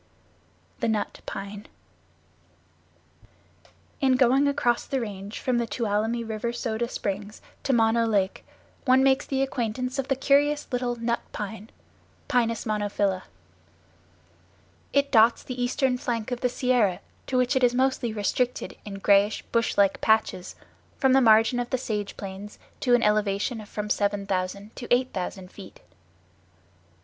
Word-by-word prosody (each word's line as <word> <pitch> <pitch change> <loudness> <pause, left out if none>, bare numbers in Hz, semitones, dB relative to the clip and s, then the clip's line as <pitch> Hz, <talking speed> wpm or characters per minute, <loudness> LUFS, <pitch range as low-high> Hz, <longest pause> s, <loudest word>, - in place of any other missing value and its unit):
The 235 - 0
Nut 220 -2 -2
Pine 200 +1 -7 2.3
In 265 -2 +3
going 265 +2 +4
across 245 -4 +1
the 270 - -1
Range 205 -2 -6
from 250 -2 0
the 235 - -1
Tuolumne 225 +1 -1
River 220 +1 -2
Soda 235 -1 -2
Springs 205 +1 -4 0.2
to 275 - -1
Mono 230 -1 +3
Lake 195 -3 0 0.4
one 260 0 +5
makes 265 0 +3
the 270 -1 0
acquaintance 255 +1 -2
of 270 - -2
the 270 - +1
curious 285 +2 +2
little 245 -1 -1
Nut 235 0 -1
Pine 215 +1 -6 0.6
(Pinus 230 -3 +1
monophylla). 205 -3 -1 1.7
It 280 0 +2
dots 230 0 +5
the 255 -1 -5
eastern 250 +1 +1
flank 230 -1 -3
of 245 - -3
the 250 - +2
Sierra 245 -7 +1 0.3
to 260 - 0
which 250 +2 +2
it 260 - +2
is 245 0 +4
mostly 260 -2 +1
restricted 230 +4 -1
in 205 -1 -7
grayish 200 +1 +3
bush 230 -1 +1
like 200 -1 +3
patches, 220 -4 +1 0.4
from 265 -2 +3
the 270 - +6
margin 225 +1 +5
of 245 0 -3
the 255 - 0
sage 210 -5 -4
plains 195 +1 -8 0.2
to 245 -2 +4
an 240 - +1
elevation 210 +2 +1
of 210 - -13
from 210 0 -4
7000 200 0 -2
to 240 - -6
8000 190 -7 -1
feet. 195 - -12
230 Hz, 140 wpm, -26 LUFS, 205-255 Hz, 2.3 s, the